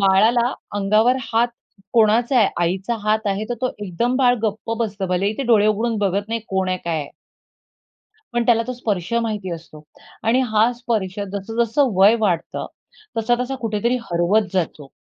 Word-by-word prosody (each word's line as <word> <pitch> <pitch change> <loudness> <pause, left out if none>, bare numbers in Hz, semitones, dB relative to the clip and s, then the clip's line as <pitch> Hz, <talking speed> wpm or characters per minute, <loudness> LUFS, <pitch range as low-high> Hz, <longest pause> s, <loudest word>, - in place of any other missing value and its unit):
बाळाला 220 +6 +4 0.2
अंगावर 215 +5 +3 0.2
हात 235 +2 +3 0.4
कोणाचा 235 +3 +3
आहे? 215 - +5
आईचा 190 +6 -1
हात 215 +1 +1
आहे, 200 +1 -1
तर 240 - 0
तो 255 - +2 0.2
एकदम 235 +7 -1
बाळ 250 -2 +4
गप्प 220 +1 -2
बसतं. 205 -4 -2
भलेही 185 +3 +1
ते 275 - 0
डोळे 220 -4 +4
उघडून 225 +2 +1
बघत 200 +1 0
नाही. 230 0 -2
कोण 190 -1 0
आहे? 185 - 0
काय 170 -1 -1
आहे? 145 - -7 1.3
पण 240 0 +1
त्याला 230 -1 +4
तो 255 - -2
स्पर्श 210 -6 -3
माहिती 210 -5 -3
असतो 160 -2 -11 0.4
आणि 240 +3 +4
हा 220 +2 +4
स्पर्श 220 -5 -3
जसं-जसं 225 +7 0
वय 195 +4 +6
वाढतं, 185 -7 -1 0.5
तसा-तसा 245 +3 0
कुठेतरी 230 +3 0
हरवत 180 +4 +2
जातो. 160 -6 -2
215 Hz, 160 wpm, -21 LUFS, 195-235 Hz, 1.3 s, वय